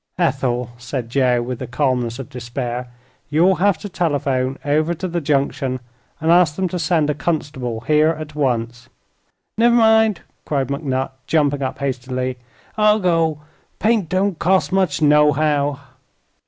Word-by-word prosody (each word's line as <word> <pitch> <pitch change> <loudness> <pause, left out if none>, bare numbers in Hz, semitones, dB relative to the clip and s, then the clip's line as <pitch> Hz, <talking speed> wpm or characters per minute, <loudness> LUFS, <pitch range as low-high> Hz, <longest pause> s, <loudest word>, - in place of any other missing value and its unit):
"Ethel," 130 -7 0
said 120 -1 -5
Joe, 125 -2 +2
with 125 0 -5
the - - -5
calmness 125 -3 -1
of 135 - -7
despair, 125 -1 -5 0.4
"you'll 170 +5 +3
have 195 0 +2
to 205 - -7
telephone 140 -7 -1
over 155 +4 +1
to 185 - -4
the 170 -1 -2
Junction 135 -3 0 0.4
and 160 +1 +1
ask 170 -4 +4
them 190 +1 0
to 180 - -3
send 155 -2 +1
a - - -1
constable 140 -7 -3
here 150 +4 +3
at 155 -1 -4
once." 120 -4 -2 0.7
"Never 235 +1 +5
mind," 220 -3 +4 0.2
cried 140 -3 -1
McNutt, 135 -2 -2 0.2
jumping 145 -3 +1
up 130 0 -3
hastily; 130 -2 -3 0.4
"I'll 210 0 +5
go. 165 -6 +1 0.4
Paint 215 -6 +1
don't 185 -1 0
cost 190 +2 +2
much, 185 -6 +1
nohow." 150 -1 +3
145 Hz, 145 wpm, -20 LUFS, 130-170 Hz, 0.7 s, Never